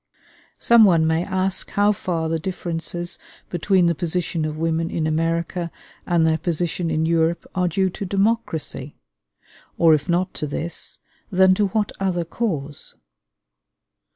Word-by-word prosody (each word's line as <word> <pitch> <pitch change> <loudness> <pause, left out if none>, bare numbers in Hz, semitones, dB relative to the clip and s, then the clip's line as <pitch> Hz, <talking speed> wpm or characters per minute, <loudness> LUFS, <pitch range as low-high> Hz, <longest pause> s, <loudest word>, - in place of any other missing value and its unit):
Some 235 -1 +6
one 170 -6 +5
may 160 +1 +1
ask 190 0 -1
how 205 +1 +3
far 170 -5 -2
the 165 0 -1
differences 175 0 -4 0.3
between 180 +1 +2
the 170 - +3
position 170 0 -2
of 155 0 -4
women 165 +1 0
in 160 - -1
America 165 +2 -1 0.4
and 170 -2 +3
their 160 0 +2
position 170 +1 -1
in 160 0 +1
Europe 165 +1 +1
are 180 -1 +1
due 190 +2 +1
to 200 - -5
democracy? 195 - -1 0.8
or 165 -2 +6
if 150 0 0
not 180 +2 +1
to 150 - -3
this, 160 +4 -3 0.3
then 190 0 +5
to 205 +2 +2
what 210 +1 -1
other 180 -3 0
cause? 155 -8 -3
170 Hz, 145 wpm, -22 LUFS, 160-185 Hz, 0.8 s, Some